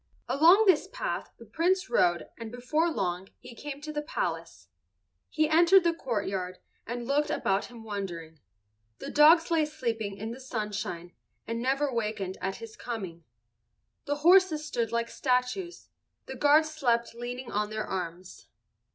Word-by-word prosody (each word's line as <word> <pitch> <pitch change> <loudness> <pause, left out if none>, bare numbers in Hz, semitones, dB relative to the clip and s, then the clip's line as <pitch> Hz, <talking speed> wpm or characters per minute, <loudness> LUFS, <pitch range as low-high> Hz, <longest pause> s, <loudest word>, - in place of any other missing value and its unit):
Along 340 +9 +6
this 370 -6 +4
path - - -3
the 230 - -13
Prince 365 - +1
rode 175 -1 +2
and 225 -1 -7
before 280 +7 0
long 185 - -2
he 250 -1 -12
came 285 +3 -7
to 305 +1 -6
the 295 - -2
palace. 300 - -4 0.6
He 310 -1 +1
entered 340 +4 +6
the 340 -1 +2
courtyard 195 - -3 0.3
and 240 0 -4
looked 290 +3 +1
about 195 -9 0
him 235 -2 -12
wondering. 175 -7 -6 0.6
The - - -7
dogs 325 +3 +6
lay 325 -2 +3
sleeping 225 -9 -3
in 220 +2 -5
the 240 - -8
sunshine 210 -8 -4 0.3
and 230 +1 -3
never 270 +2 0
wakened 210 -5 -3
at 195 +1 -2
his 230 -1 -10
coming. 185 -9 -6 0.8
The 290 - -1
horses 350 -4 +5
stood 235 -7 -2
like 235 0 0
statues. 260 +8 -1 0.4
The 265 - -7
guards 295 +4 +4
slept 235 -7 0
leaning 245 +1 -6
on 210 0 -1
their 215 0 -3
arms. 180 -1 -6
240 Hz, 150 wpm, -28 LUFS, 210-305 Hz, 0.8 s, Along